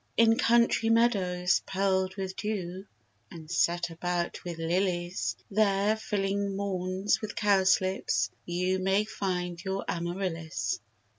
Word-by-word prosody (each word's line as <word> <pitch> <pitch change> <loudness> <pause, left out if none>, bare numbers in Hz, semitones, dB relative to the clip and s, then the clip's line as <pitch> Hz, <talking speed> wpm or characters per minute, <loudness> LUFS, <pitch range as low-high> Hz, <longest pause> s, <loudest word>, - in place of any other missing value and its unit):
In 225 0 +6
country 235 -1 +3
meadows, 190 -6 +2
pearl'd 190 -1 0
with 190 -1 -4
dew, 195 -3 -4 0.4
And 160 -1 -10
set 175 0 +1
about 175 +1 -2
with 175 -2 -5
lilies; 175 +1 -1 0.2
There, 205 0 +3
filling 200 -2 -1
maunds 190 0 -1
with 215 -2 -5
cowslips, 190 -2 +2
you 180 +2 0
May 195 +2 +2
find 180 -4 -3
your 190 0 -3
Amarillis. 170 - -2
190 Hz, 115 wpm, -29 LUFS, 175-200 Hz, 0.4 s, In